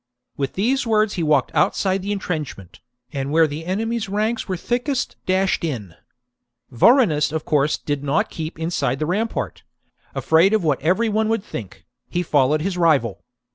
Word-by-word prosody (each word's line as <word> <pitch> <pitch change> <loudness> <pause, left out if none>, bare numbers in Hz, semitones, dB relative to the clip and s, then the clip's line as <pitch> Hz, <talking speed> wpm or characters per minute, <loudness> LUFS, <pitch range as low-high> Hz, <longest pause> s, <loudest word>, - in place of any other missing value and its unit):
With 135 -2 -3
these 250 +6 0
words 215 -1 +2
he 180 - -2
walked 150 -4 +2
outside 190 -1 +1
the 200 +2 -3
entrenchment, 155 - -5 0.3
and 135 -1 -3
where 160 +1 +5
the 155 +2 -5
enemy's 220 +2 -2
ranks 215 +3 -1
were 185 -2 -2
thickest 250 - -2
dashed 190 0 +1
in. 115 - -4 0.8
Vorenus 155 - +4
of 160 -1 -3
course 150 0 +2
did 145 -1 -3
not 140 +1 0
keep 160 0 -5
inside 160 -5 -1
the 155 - -1
rampart: 210 +7 -2 0.5
afraid 170 +6 +4
of 215 - 0
what 150 -4 +1
every 185 +10 +2
one 215 0 +1
would 225 -3 0
think, 110 - -8 0.2
he 175 - -1
followed 150 -1 +2
his 185 -1 -2
rival. 140 - +2
170 Hz, 165 wpm, -21 LUFS, 150-210 Hz, 0.8 s, where